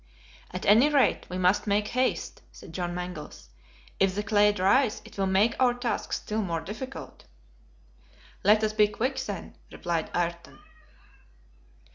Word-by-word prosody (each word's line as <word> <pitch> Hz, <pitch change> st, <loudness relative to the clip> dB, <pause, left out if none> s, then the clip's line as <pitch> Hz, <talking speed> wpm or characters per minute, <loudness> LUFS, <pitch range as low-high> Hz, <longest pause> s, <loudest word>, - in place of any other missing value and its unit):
"At 185 Hz, -, -6 dB
any 230 Hz, +8 st, +6 dB
rate, 285 Hz, -3 st, +2 dB
we 180 Hz, -, -4 dB
must 185 Hz, +3 st, +2 dB
make 210 Hz, +1 st, +1 dB
haste," 255 Hz, +1 st, -1 dB
said -, -, -13 dB
John 175 Hz, 0 st, -3 dB
Mangles. 180 Hz, -, -7 dB, 0.5 s
"If 190 Hz, -1 st, +2 dB
the 210 Hz, -, -1 dB
clay 210 Hz, 0 st, +4 dB
dries, 210 Hz, +5 st, +2 dB
it -, -, -14 dB
will 195 Hz, -1 st, 0 dB
make 200 Hz, +5 st, +3 dB
our 250 Hz, -2 st, +3 dB
task 245 Hz, -1 st, -3 dB
still 215 Hz, +1 st, -2 dB
more 170 Hz, -5 st, -2 dB
difficult." 220 Hz, +10 st, -8 dB, 1.2 s
"Let 210 Hz, +2 st, +5 dB
us 215 Hz, 0 st, +1 dB
be 210 Hz, -1 st, +4 dB
quick, 255 Hz, +6 st, -2 dB
then," 205 Hz, -7 st, -6 dB
replied 170 Hz, -2 st, -2 dB
Ayrton. 170 Hz, 0 st, -3 dB
205 Hz, 145 wpm, -27 LUFS, 180-225 Hz, 1.2 s, any